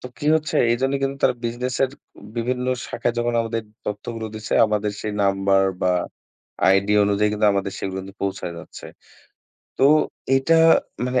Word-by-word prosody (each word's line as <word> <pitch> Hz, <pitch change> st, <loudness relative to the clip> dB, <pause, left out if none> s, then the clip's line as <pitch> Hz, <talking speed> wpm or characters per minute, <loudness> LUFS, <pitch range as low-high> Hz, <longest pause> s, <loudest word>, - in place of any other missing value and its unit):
তো -, -, -8 dB
কি 150 Hz, -, -4 dB
হচ্ছে 155 Hz, -1 st, -1 dB
এইজন্য 135 Hz, +3 st, +1 dB
কিন্তু 135 Hz, 0 st, -1 dB
তারা 130 Hz, -, +4 dB
বিজনেসের 125 Hz, +3 st, -1 dB, 0.5 s
বিভিন্ন 125 Hz, +2 st, -1 dB, 0.2 s
শাখায় 115 Hz, 0 st, -2 dB
যখন 120 Hz, 0 st, 0 dB
আমাদের 115 Hz, 0 st, -2 dB, 0.2 s
তথ্যগুলো 110 Hz, +2 st, -4 dB
দিছে 110 Hz, 0 st, -6 dB
আমাদের 105 Hz, -1 st, -1 dB
সেই 105 Hz, -, -3 dB
নাম্বার 95 Hz, 0 st, +2 dB, 0.2 s
বা 90 Hz, -, +3 dB, 0.8 s
আইডি 95 Hz, +2 st, +3 dB
অনুযায়ী 100 Hz, +1 st, +1 dB, 0.2 s
আমাদের 100 Hz, -1 st, -2 dB
সেগুলো 95 Hz, -1 st, -4 dB
কিন্তু 95 Hz, +1 st, -12 dB
পৌঁছায় 95 Hz, -3 st, -3 dB
যাচ্ছে। -, -, -11 dB, 0.9 s
তো -, -, +4 dB, 0.5 s
এটা 150 Hz, +5 st, +3 dB, 0.5 s
মানে 125 Hz, 0 st, +1 dB
115 Hz, 145 wpm, -22 LUFS, 100-125 Hz, 0.9 s, তারা